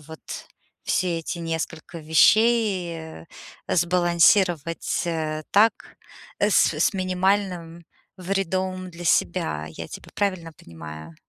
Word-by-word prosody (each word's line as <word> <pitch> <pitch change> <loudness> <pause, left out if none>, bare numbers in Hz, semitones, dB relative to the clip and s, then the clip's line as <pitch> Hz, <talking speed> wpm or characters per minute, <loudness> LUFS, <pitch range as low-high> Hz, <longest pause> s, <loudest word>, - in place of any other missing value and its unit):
вот 160 +1 -12 0.6
все 175 -2 0
эти 165 +2 -5
несколько 165 0 -5
вещей 170 - +2 0.4
сбалансировать, 175 -1 +2
э, 155 -2 -2
так, 220 +3 +2 0.4
с - - +3
с - - +1
минимальным 185 -2 -1 0.3
вредом 185 0 -2
для 175 0 -10
себя. 80 - 0
Я 80 +1 -8
тебя - - -10
правильно 185 -5 -2
понимаю? 80 -1 -11
170 Hz, 95 wpm, -24 LUFS, 160-185 Hz, 0.6 s, с